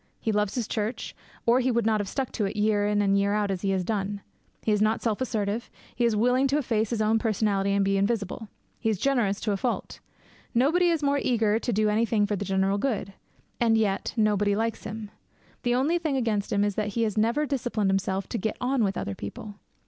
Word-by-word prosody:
He 220 - -1
loves 210 -1 0
his 240 -4 -1
church, 220 +2 -3 0.3
or 235 +2 +4
he 260 0 +1
would 235 -2 +1
not 220 -1 +2
have 205 - -2
stuck 265 +4 -3
to 210 - -1
it 195 - -3
year 210 -1 +2
in 205 0 +2
and 200 0 +3
year 200 +1 +1
out 210 -1 0
as 185 -2 -3
he 195 - -1
has 190 -1 +1
done. 200 0 -2 0.4
He 220 - +1
is 210 -1 +2
not 215 +1 +1
self 225 0 -1
assertive; 220 -2 -2 0.3
he 240 - +1
is 230 -2 +2
quite 210 - +1
willing 255 +2 +3
to 280 +2 +1
efface 225 -6 0
his 225 -2 0
own 220 +1 +3
personality 205 -3 +1
and 200 0 +2
be 195 0 +2
invisible. 210 +1 -1 0.3
He 225 - 0
is 215 - 0
generous 230 -5 +1
to 215 - 0
a 200 - 0
fault. 240 +4 -3 0.6
Nobody 325 +9 +4
is 325 -3 0
more 280 0 +2
eager 225 -3 +2
to 240 - -2
do 215 0 +2
anything 215 0 +2
for 205 0 -1
the 200 - -3
general 195 +1 +1
good. 200 -6 -2 0.5
And 225 -2 +3
yet 200 -2 0
nobody 205 -2 +2
likes 225 +1 -2
him. 215 -1 -6 0.5
The 245 -1 +1
only 300 +7 +2
thing 310 -5 -1
against 220 -5 -1
him 200 0 +2
is 205 0 +1
that 210 0 -2
he 230 - +3
has 215 -3 -1
never 230 +8 +2
disciplined 245 -8 0
himself 195 0 -1
to 235 - -2
get 220 +3 -2
on 250 -1 +1
with 195 -2 0
other 100 - -3
people. 200 - -8
215 Hz, 235 wpm, -26 LUFS, 200-235 Hz, 0.6 s, or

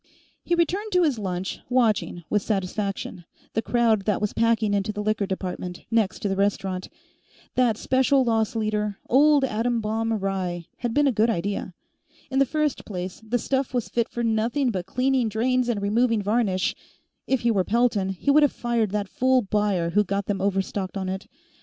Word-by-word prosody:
He 345 - +1
returned 385 +6 0
to 360 -1 +4
his 285 -8 +1
lunch, 185 -2 -3
watching, 225 -8 +1
with 210 - +1
satisfaction, 195 -2 -3 0.3
the 220 - +1
crowd 225 -4 +2
that 210 -3 +1
was 210 -1 -1
packing 225 -2 +2
into 200 +1 0
the 210 0 -4
Liquor 215 -1 0
Department, 180 -2 -5
next 225 -4 +1
to - - +1
the 195 - 0
restaurant. 195 -2 -1 0.6
That 240 -4 +2
special 265 +2 +3
loss 225 -2 +1
leader, 210 -2 -1
Old 290 +2 +5
Atom 235 0 0
Bomb 225 +1 -1
Rye, 190 -4 -2
had 240 -2 -3
been 290 - +4
a 275 - +4
good 225 0 +2
idea. 200 -2 -2 0.6
In 265 - +1
the 275 - +4
first 305 -1 -1
place, 185 -2 -6
the 225 +3 0
stuff 265 +2 -1
was 245 - -1
fit 235 -1 0
for 240 - -3
nothing 230 +4 +1
but 185 -3 -4
cleaning 255 +1 +1
drains 245 +3 +1
and 225 -4 0
removing 220 +2 +1
varnish; 205 -3 +1 0.5
if 265 -2 +1
he 235 - +2
were 195 -4 +2
Pelton, 220 -3 +1
he 190 +9 0
would 300 +2 +6
have 290 - +4
fired 235 -3 0
that 205 0 -2
fool 255 +4 +2
buyer 195 -4 0
who 210 +4 +3
got 200 0 -2
them 200 -1 -2
overstocked 195 0 -1
on 190 -1 -3
it. 190 +1 -5
215 Hz, 185 wpm, -25 LUFS, 195-245 Hz, 0.6 s, would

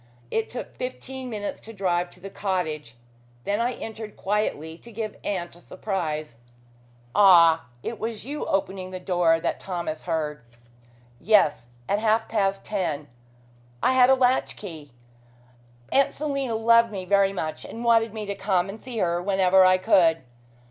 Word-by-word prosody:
It 225 0 -1
took 245 - -7
fifteen 255 0 -6
minutes 210 -3 -4
to 225 - -11
drive 180 -3 0
to 180 - -17
the 195 +2 -9
cottage. 160 - -3 0.5
Then 205 +1 -1
I 245 +2 0
entered 220 -2 -8
quietly 170 -6 -2
to 235 - -14
give 215 -1 -5
aunt 175 -4 -3
a 175 - -16
surprise." 155 - -4 0.8
"Ah! 170 -6 +6 0.2
It 230 - -5
was 225 -1 -4
you 290 +3 -4
opening 190 -1 -1
the 185 0 -6
door 175 -3 +2
that 170 - -2
Thomas 170 -4 -4
heard." 155 -3 -2 0.8
"Yes! 155 - +3 0.2
At 205 - +1
half 220 +1 +2
past 195 -3 0
ten; 160 - -3 0.7
I 255 - +4
had 255 -1 +6
a 265 - +7
latch 255 0 +2
key. 160 -8 -9 1.0
Aunt 275 0 +3
Selina 275 -5 -2
loved 230 +1 +4
me 190 -3 -5
very 200 +1 +3
much 160 -5 -4
and 230 - -8
wanted 230 -1 +3
me 215 0 -5
to 200 - -3
come 195 -2 0
and 215 +3 -8
see 250 -3 -7
her 175 -3 +1
whenever 190 0 +4
I 185 0 +5
could. 180 -6 +3
195 Hz, 160 wpm, -25 LUFS, 175-225 Hz, 1.0 s, a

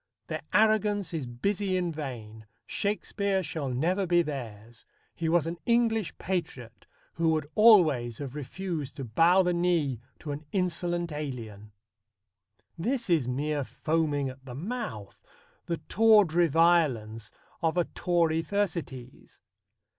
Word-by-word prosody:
Their - - -4
arrogance 210 -3 +2
is 150 -6 -3
busy 190 +10 -1
in 175 -2 -1
vain. 115 -8 -7 0.2
Shakespeare 200 -1 -1
shall 155 -5 -3
never 175 +10 0
be 175 0 +4
theirs. 120 -6 -7 0.3
He 165 -1 -2
was 170 -1 +3
an 170 +1 -4
English 230 -4 +1
patriot, 135 - -5 0.3
who 165 -1 +1
would 155 -2 +1
always 155 - +5
have 135 -3 -6
refused 150 0 -5
to 135 - -6
bow 165 - +4
the 180 0 +1
knee 170 -8 +1 0.2
to 150 - -6
an 145 +2 -5
insolent 175 -2 -1
alien. 115 -8 -6 1.1
This 235 +2 -1
is 155 -7 +3
mere 145 +3 -1
foaming 150 -1 -1
at 130 0 -9
the 125 -2 -9
mouth 180 - -6 0.5
the 170 - -1
tawdry 205 -7 +5
violence 135 -10 +2 0.3
of 165 0 0
a 175 - +4
Tory 165 -2 0
Thersites. 165 - -4
165 Hz, 130 wpm, -28 LUFS, 130-185 Hz, 1.1 s, always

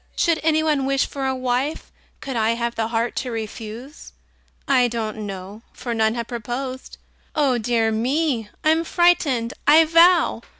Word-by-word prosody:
Should 335 -4 +1
any 315 0 +2
one 295 -4 +1
wish 275 0 +1
for 275 -1 -4
a 265 - -1
wife, 255 +4 -2 0.3
Could 270 -2 -5
I 225 0 +1
have 235 0 -2
the 225 -1 -2
heart 230 +1 -1
to 260 - -2
refuse? 225 +4 -7 0.5
I 255 -3 +4
don't 220 -2 -4
know 195 +2 -8
for 240 - -5
none 220 0 +1
have 235 -1 -4
proposed 250 +3 -5 0.4
Oh, 275 -5 +2
dear 225 -1 +1
me! 245 0 -1
I'm 320 +1 +3
frightened, 305 -9 +2
I 315 +2 +7
vow! 335 +2 +4
250 Hz, 160 wpm, -22 LUFS, 225-295 Hz, 0.5 s, I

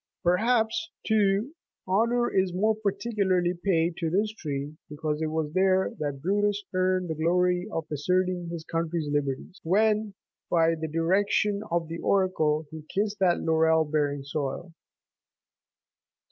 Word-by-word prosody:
83 - - +5
Perhaps, 235 - +1 0.2
too, 215 +4 +2 0.3
honour 235 +5 +2
is 190 -2 +1
more 215 +4 +3
particularly 200 -4 0
paid 170 -3 +1
to 165 -3 -1
this 205 +5 +1
tree 145 -5 -5
because 150 0 -3
it 160 - 0
was 155 -1 -2
there 190 0 +2
that 145 -2 -4
Brutus84 205 +1 +1
earned 185 -1 +1
the - - 0
glory 180 +3 +1
of 165 -4 -3
asserting 180 +3 0
his 170 -2 -5
country's 165 -2 -2
liberties, 145 +4 -2
when, 210 +3 +1 0.3
by 165 -1 +3
# 160 - -12
the 160 - -1
direction 200 +5 +1
of 170 -1 0
the 165 +1 -6
oracle, 160 -6 +1
he 160 -1 -8
kissed 205 +1 -1
that 180 -3 +3
laurel 160 0 +3
bearing 145 -2 -1
soil. 145 +4 -4
180 Hz, 145 wpm, -27 LUFS, 160-200 Hz, 0.3 s, 83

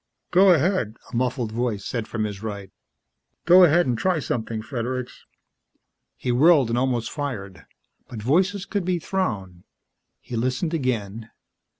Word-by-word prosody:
"Go 190 +1 +6
ahead," 165 - +1 0.2
a - - -3
muffled 125 -2 -1
voice 115 -3 -2
said 115 -3 -3
from 110 - -3
his 105 -2 -4
right. 100 -3 -6 0.7
"Go 180 +2 +8
ahead 175 +2 +4
and 125 - 0
try 180 +8 +1
something, 115 -5 -3
Fredericks." 125 +1 -5 0.9
He 125 - -2
whirled 140 0 +5
and 115 - 0
almost 125 -3 -1
fired 105 - -6 0.4
but 115 - -8
voices 180 - +1
could 200 -2 -2
be 180 0 0
thrown. 100 - -3 0.6
He 120 - -8
listened 130 +8 -1
again. 115 -7 -2
125 Hz, 140 wpm, -24 LUFS, 110-165 Hz, 0.9 s, Go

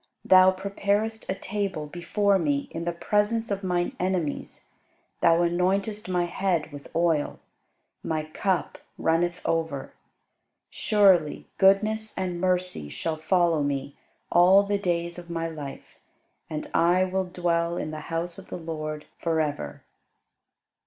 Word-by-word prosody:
Thou 185 0 +7
preparest 200 +3 -1
a 190 - 0
table 195 -5 -3
before 190 +5 +1
me 145 -4 0
in 165 +1 -5
the 175 - 0
presence 210 +5 0
of 200 0 -2
mine 180 -1 -1
enemies: 180 -5 -2 0.5
Thou 165 0 +5
anointest 190 +4 0
my 180 -1 +1
head 175 -3 -1
with 145 -1 -10
oil; 165 -3 +1 0.7
my 155 -1 -1
cup 175 +4 -2 0.2
runneth 175 +2 +1
over. 160 -4 -2 0.8
Surely 190 -7 +3
goodness 215 +3 +3
and 180 -2 -2
mercy 180 - 0
shall 75 - -3
follow 165 0 +2
me 140 -1 -2 0.4
all 185 +3 +6
the 200 0 -1
days 170 -2 -1
of 175 -1 -12
my 165 -1 -2
life: 150 -4 -9 0.5
And 155 -1 -4
I 175 +2 +4
will 185 0 -1
dwell 175 -1 0
in 155 - -3
the 155 - -5
house 170 +2 -3
of 190 - -12
the - - -5
LORD 155 -2 -5
for 165 -1 0
ever. 150 -2 -3
175 Hz, 135 wpm, -26 LUFS, 160-190 Hz, 0.8 s, Thou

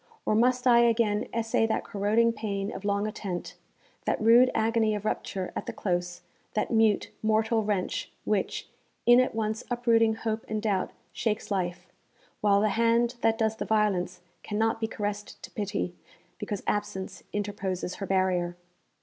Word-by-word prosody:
or - - +2
must 250 +3 +3
I 240 -2 +7
again 230 -3 +2
essay 225 0 +1
that 220 - 0
corroding 215 +3 +2
pain 200 -2 -3
of 190 - -7
long 200 0 0
attent, 195 -4 -5 0.5
that - - +1
rude 235 +3 +6
agony 220 -1 +2
of 210 0 -5
rupture 190 -3 -3
at - - -4
the - - -3
close, 175 -2 -2 0.3
that 215 - 0
mute, 220 -3 +3
mortal 220 +1 +2
wrench, 210 - -2
which, - - -1 0.4
in 240 +1 +7
at 255 -3 +1
once 220 +1 -1
uprooting 230 -2 +3
hope 220 0 -3
and 215 - -2
doubt, 205 -3 0 0.2
shakes 215 -1 -2
life, 180 -2 -2 0.6
while 200 -1 +4
the 215 - +3
hand 230 +3 +2
that 225 0 +3
does 220 -1 0
the - - -2
violence 190 -5 +1 0.2
cannot 225 +2 0
be 220 - +1
caressed 205 -1 -4
to - - -9
pity, 205 -3 -2 0.5
because 205 -2 -4
absence 190 -2 -3
interposes 195 -3 -3
her 195 - -2
barrier. 180 -2 +1
215 Hz, 160 wpm, -28 LUFS, 200-225 Hz, 0.6 s, I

